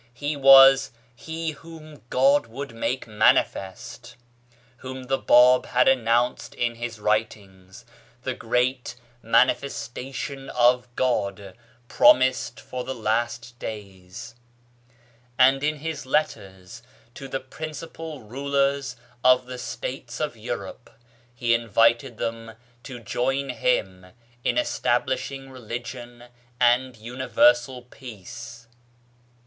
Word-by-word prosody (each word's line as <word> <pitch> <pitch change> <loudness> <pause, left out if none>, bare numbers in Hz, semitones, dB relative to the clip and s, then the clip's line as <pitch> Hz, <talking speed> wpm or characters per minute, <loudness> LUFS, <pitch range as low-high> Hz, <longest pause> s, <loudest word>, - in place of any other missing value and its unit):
He 145 +3 -3
was 135 -1 +7
" 120 0 -35
He 160 +4 -5
whom 155 -1 -13
God 135 0 +3
would 130 +2 -7
make 125 +3 -3
manifest," 110 +1 0 0.6
whom 130 +1 -8
the 135 +1 -1
Bab 125 +1 +5
had 125 +1 +2
announced 120 -1 +1
in 120 -1 -1
his 115 -1 -6
writings, 105 -1 -3 0.4
the 130 - -2
great 125 +2 -1 0.3
Manifestation 135 +3 -1
of 125 +1 +3
God 100 -6 -2 0.3
promised 130 +1 +3
for 125 -1 -6
the 130 - -5
last 120 +2 -2
days; 95 -4 -9 1.0
and 135 +2 +4
in 150 +1 +1
his 155 -2 -6
letters 95 -11 -3 0.3
to 135 - -9
the 135 0 -3
principal 155 +2 -8
Rulers 140 +2 -1 0.3
of 125 0 +5
the 125 0 -8
States - - -6
of - - -2
Europe - - -7 0.5
he 120 -1 +1
invited 115 +2 +2
them 115 0 -5 0.3
to 125 0 -9
join 135 +5 -2
him 95 -8 -1 0.4
in 125 - 0
establishing 130 +2 -1
religion 120 0 -8 0.4
and 125 0 +2
universal 125 +2 +1
peace. 115 -1 -11
125 Hz, 105 wpm, -24 LUFS, 115-135 Hz, 1.0 s, was